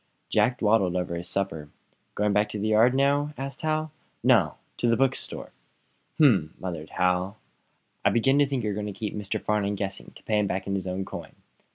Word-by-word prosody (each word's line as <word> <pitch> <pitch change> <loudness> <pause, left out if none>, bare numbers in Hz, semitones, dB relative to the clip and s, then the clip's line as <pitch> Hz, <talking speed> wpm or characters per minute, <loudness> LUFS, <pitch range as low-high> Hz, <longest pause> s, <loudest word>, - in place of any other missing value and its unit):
Jack 125 0 +2
dawdled 105 -5 +2
over 90 -1 -1
his 85 +1 -4
supper. 80 -7 -2 0.5
"Going 105 0 +1
back 105 +1 +2
to 105 - -4
the 110 +2 0
yard 115 +4 +5
now?" 145 +2 +2
asked 135 0 -5
Hal. 155 0 -1 0.3
"No; 115 - +4 0.2
to 120 - +1
the 115 - +3
bookstore." 135 0 -1 0.7
"Hm!" 105 - +4
muttered 85 -4 -5
Hal. 90 +3 0 0.7
"I - - +5
begin 135 +4 +3
to 145 - +4
think 135 -4 -2
you're 105 -1 -1
going 105 +1 -3
to 105 - -4
keep 105 0 -4
Mr. 105 -2 -3
Farnum 105 -1 0
guessing, 95 -1 -4
to - - -15
pay 105 -1 +1
him 105 - +1
back 95 0 -2
in 100 - -2
his 95 -1 -2
own 95 +1 -2
coin." - - -8
105 Hz, 200 wpm, -26 LUFS, 95-125 Hz, 0.7 s, yard